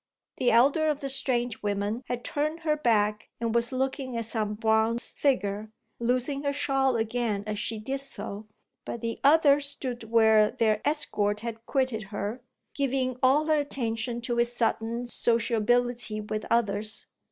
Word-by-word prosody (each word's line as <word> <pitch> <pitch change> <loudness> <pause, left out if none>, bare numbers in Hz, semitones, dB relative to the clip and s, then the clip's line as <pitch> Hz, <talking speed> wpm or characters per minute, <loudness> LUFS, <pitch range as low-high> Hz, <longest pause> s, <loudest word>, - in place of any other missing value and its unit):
The 245 - +2
elder 280 +7 +4
of 300 -2 0
the 275 - -3
strange 245 -4 -1
women 205 +3 -1
had 245 -1 -3
turned 305 +3 -2
her 310 -2 +1
back 215 -7 +1
and 230 -1 -1
was 235 0 +1
looking 260 -1 -2
at 230 - -2
some 215 -2 -2
bronze 220 +1 +1
figure, 215 -6 0 0.3
losing 250 +4 0
her 285 -1 0
shawl 270 -2 +1
again 225 -2 -1
as 210 -1 -3
she 225 - -1
did 265 +6 -3
so; 210 -5 -5 0.4
but 235 - -6
the 230 0 -3
other 290 -1 +6
stood 260 -4 -2
where 220 -1 +5
their 220 -4 +1
escort 210 -9 0
had 230 0 -6
quitted 255 -6 0
her, 205 +4 -4 0.3
giving 260 -2 -1
all 275 +4 +4
her 310 -1 +3
attention 240 -4 -2
to 235 0 -2
his 235 0 +2
sudden 235 0 -1
sociability 235 -1 +1
with 215 0 -4
others. 215 -2 0
235 Hz, 155 wpm, -27 LUFS, 220-265 Hz, 0.4 s, other